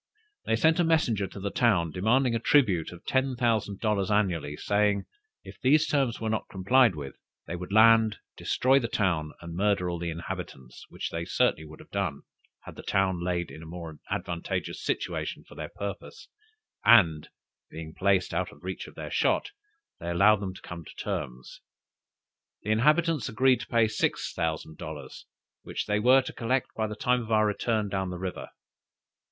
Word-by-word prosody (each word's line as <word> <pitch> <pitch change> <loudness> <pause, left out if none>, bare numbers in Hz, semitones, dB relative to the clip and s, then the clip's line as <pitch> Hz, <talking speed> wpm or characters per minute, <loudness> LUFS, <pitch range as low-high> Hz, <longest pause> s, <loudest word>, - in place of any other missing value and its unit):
They 115 - +2
sent 160 +8 +3
a - - +5
messenger 125 - +2
to 100 - -10
the 100 +1 -3
town, 95 -10 +2
demanding 115 - +2
a 115 - 0
tribute 110 - +3
of 90 0 -13
ten 130 0 +1
thousand 110 -5 0
dollars 105 -4 0
annually, 85 -9 0
saying, 100 -1 +1 0.4
if - - -13
these 150 +3 +4
terms 135 -6 0
were 115 - -3
not 110 - -2
complied 110 +2 +3
with, 70 -3 -7 0.3
they 85 - -5
would 90 +2 -7
land, 110 0 +6 0.2
destroy 135 +2 +2
the 120 - -2
town, 85 -9 0
and 85 -1 -8
murder 95 -2 +1
all 85 - -4
the 85 0 -3
inhabitants: 85 -7 -7
which - - -5
they 85 - -3
would 85 - -6
certainly 80 0 +1
have - - -15
done, 90 -8 -2 0.4
had - - -11
the - - -7
town 95 -3 0
laid 85 -1 -2
in 80 - -10
a 80 - -10
more 80 -2 -8
advantageous 85 -1 -3
situation - - -3
for - - -16
their - - -6
purpose; 100 -1 -7 0.5
but 85 -10 +5 0.4
being 80 0 -8
placed 95 -1 +1
out - - -1
of 75 - -16
the - - -14
reach 95 0 -5
of - - -14
their - - -7
shot, 410 - +1 0.5
they 85 - -5
allowed 100 +4 +5
them 95 -2 -5
to - - -12
come 85 -1 -8
to - - -13
terms. 60 0 -5 1.0
The 105 - -1
inhabitants 150 +4 +2
agreed 125 +2 +3
to - - -7
pay 115 -1 +3
six 110 - -1
thousand 80 -1 -3
dollars, - - -8 0.3
which - - -4
they 105 0 +1
were 130 +4 +5
to - - -7
collect 125 +2 -1
by 110 -1 -1
the 105 - -6
time 125 +2 +1
of 115 -1 -7
our 110 -1 +4
return 105 0 0
down 95 -1 -2
the 90 - -5
river. 95 0 -5
100 Hz, 185 wpm, -28 LUFS, 85-115 Hz, 1.0 s, land